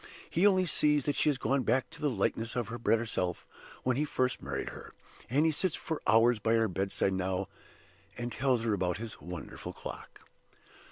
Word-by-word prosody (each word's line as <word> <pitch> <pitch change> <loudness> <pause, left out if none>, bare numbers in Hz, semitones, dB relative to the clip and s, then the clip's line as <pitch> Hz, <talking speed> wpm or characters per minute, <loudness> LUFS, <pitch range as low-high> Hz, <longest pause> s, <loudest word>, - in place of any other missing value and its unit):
He 180 +5 +4
only 185 -2 +4
sees 150 -4 +3
that 145 - 0
she - - +3
has 145 - +1
gone 135 +1 +1
back 125 +2 +1
to 165 -1 -12
the 150 - +2
likeness 115 0 -1
of 120 -4 -1
her 120 +1 -5
better 115 -1 +2
self 90 -6 -2 0.4
when 125 -1 +1
he 150 - +2
first 130 -4 0
married - - -3
her; - - -11 0.3
and 145 +6 +3
he 160 - +4
sits 160 +2 0
for 160 -2 -4
hours 115 +1 +5
by 110 +2 +1
her 115 -1 +3
bedside 95 +1 0
now, 95 +1 -1 0.7
and 120 0 -3
tells 125 -2 +1
her 115 -2 +1
about 90 -3 0
his 110 +1 -7
wonderful 90 0 -7
clock. - - -9
120 Hz, 200 wpm, -31 LUFS, 105-145 Hz, 0.7 s, hours